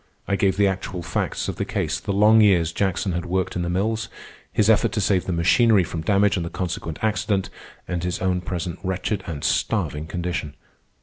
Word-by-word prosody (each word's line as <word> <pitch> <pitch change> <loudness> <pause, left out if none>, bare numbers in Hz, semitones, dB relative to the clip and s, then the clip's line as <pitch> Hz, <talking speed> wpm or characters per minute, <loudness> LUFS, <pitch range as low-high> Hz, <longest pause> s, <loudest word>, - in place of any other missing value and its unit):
I 100 - +1
gave 95 -1 +1
the 100 - +4
actual 95 -2 -2
facts - - -2
of - - -4
the - - -1
case, - - -2
the - - -4
long 105 +3 +5
years 90 -6 +4
Jackson 95 +1 -1
had 85 0 -2
worked 95 +1 -1
in 90 - -1
the 85 - -2
mills, 105 +4 -1 0.4
his 105 - +2
effort 110 -2 +3
to - - 0
save 95 -2 +1
the - - -2
machinery 95 +5 +4
from 80 -1 -5
damage 100 +3 +2
and 85 - -1
the 85 - -4
consequent 85 -4 -4
accident, 105 -2 0 0.4
and 90 -1 -3
his 90 0 -1
own 90 -1 0
present 90 -1 -4
wretched 95 +1 -2
and 80 -5 -5
starving 75 +1 0
condition. 85 -3 -4
95 Hz, 200 wpm, -23 LUFS, 85-100 Hz, 0.4 s, long